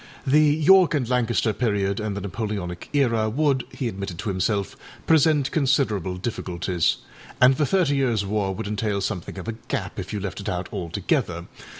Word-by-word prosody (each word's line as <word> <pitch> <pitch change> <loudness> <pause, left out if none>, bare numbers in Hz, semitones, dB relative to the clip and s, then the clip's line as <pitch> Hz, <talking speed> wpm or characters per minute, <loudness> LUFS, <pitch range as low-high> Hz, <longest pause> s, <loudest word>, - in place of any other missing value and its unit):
The 145 +3 +5
York 160 +4 +5
and 130 -5 0
Lancaster 120 -3 +1
period 100 -4 0
and 105 -2 -3
the - - -4
Napoleonic 100 -3 -4
era 115 -6 +2
would, 135 +1 +1
he 130 - -3
admitted 100 -5 -5
to 100 - -4
himself, 100 +1 -1 0.3
present 155 -3 +3
considerable 125 - +1
difficulties, 90 -4 -1 0.4
and 130 +1 +6
the 150 +1 +1
Thirty 165 -8 +2
Yearsâ 115 -7 +1
War 100 -1 -1
would - - -5
entail 105 -1 -1
something 95 -2 -4
of 95 - -7
a - - -1 0.2
gap - - -3
if - - -6
you 105 - -2
left 100 0 -5
it - - -4
out 90 0 -3
altogether. 85 -2 -2
110 Hz, 175 wpm, -24 LUFS, 95-135 Hz, 0.4 s, and